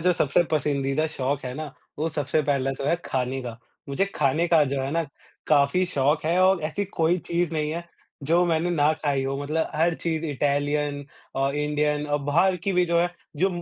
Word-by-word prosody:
जो 180 +2 +3
सबसे 155 0 +2
पसंदीदा 145 0 0
शौक 140 -2 -2
है 125 0 -4
ना, 150 -1 -6 0.3
वो 155 +2 0
सबसे 155 0 0
पहला 140 -2 0
तो - - -4
है 170 - +3
खाने 130 0 -2
का, 120 -2 -7 0.3
मुझे 140 +8 +1
खाने 150 +4 +2
का 165 -3 +5
जो 140 - 0
है 135 - -2
ना 165 +2 +1 0.4
काफ़ी 145 +5 +3
शौक 145 -3 +1
है 170 +3 +2
और 190 -1 +4
ऐसी 200 +6 -2
कोई 165 +2 +3
चीज़ 170 -1 -1
नहीं 150 -1 -1
है, 170 +2 -4 0.4
जो 170 +5 +3
मैंने 165 +1 +1
ना 155 -2 +3
खाई 140 -3 0
हो 135 0 -2
मतलब 155 +3 -1
हर 165 +2 +2
चीज़ 165 -1 -2
इटैलियन 145 0 -1 0.4
और 135 +1 +1
इंडियन 150 0 0
और 145 0 0
बाहर 175 +6 +3
की 185 +3 -2
भी 180 -1 +3
जो 170 0 +2
है, 175 +1 +1 0.3
जो 185 +6 +3
150 Hz, 205 wpm, -25 LUFS, 140-170 Hz, 0.4 s, का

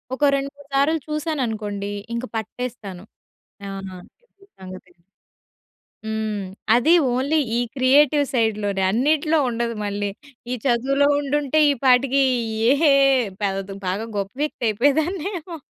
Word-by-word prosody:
ఒక 295 - -4
రెండు 275 0 -2
మూడు 285 -1 -17
సార్లు 305 +4 +2
చూసాననుకోండి 225 -10 -3 0.2
ఇంక 235 +2 -3
పట్టేస్తాను. 220 -4 -6 0.7
ఆహ్, 195 -1 -6
అంతే 400 - -23
సంగతి. 185 0 -11 1.1
హ్మ్. 215 -2 -3 0.3
అది 285 +8 +4 0.2
ఓన్లీ 280 +5 +1 0.2
ఈ - - +2 0.2
క్రియేటివ్ 285 +3 +4
సైడ్‌లోనే 210 -4 0
అన్నిట్లో 305 - +2
ఉండదు 235 0 -2
మళ్ళీ. 205 0 -2 0.4
ఈ 250 - 0
చదువులో 275 +4 +2
ఉండుంటే 290 +1 0
ఈ - - +4
పాటికి 265 +2 +4 0.5
ఏ - - +5 0.7
పెద 195 -1 0 0.3
బాగా 205 +5 -2
గొప్ప 195 0 -3
వ్యక్తి 300 -4 -4
అయిపోయేదాన్నేమో. 320 - -1
255 Hz, 115 wpm, -22 LUFS, 210-295 Hz, 1.1 s, ఏ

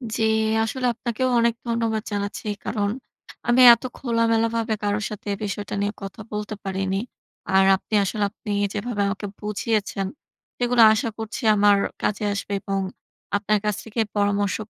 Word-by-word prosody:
জি, 225 - 0 0.4
আসলে 250 +3 -2
আপনাকেও 235 +3 -2
অনেক 235 0 +2
ধন্যবাদ 230 -2 0
জানাচ্ছি 205 +1 -3 0.2
কারণ, 205 -2 0 0.6
আমি 245 +2 +5
এত 235 - -2
খোলামেলাভাবে 230 -1 +1
কারো 205 0 +1
সাথে 210 -1 -9
এ - - -2
বিষয়টা 205 0 -4
নিয়ে 205 +1 -1
কথা 195 +3 -7
বলতে 210 0 -4
পারিনি। 190 0 -1 0.5
আর 190 0 +5
আপনি 195 - -10
আসলে 205 +2 -1
আপনি 210 -1 -7 0.2
যেভাবে 210 0 -2
আমাকে 200 +1 -3
বুঝিয়েছেন, 210 -2 -1 0.5
সেগুলা 245 -1 +4
আশা 225 +2 -1
করছি 225 +2 -5
আমার 205 0 +5 0.2
কাজে 210 0 -1
আসবে 200 0 -4
এবং 195 0 -2 0.6
আপনার 210 0 +1
কাছ 210 -1 +1
থেকে 225 +1 -6 0.2
পরামর্শ 205 -1 +1
210 Hz, 145 wpm, -23 LUFS, 205-230 Hz, 0.6 s, আমি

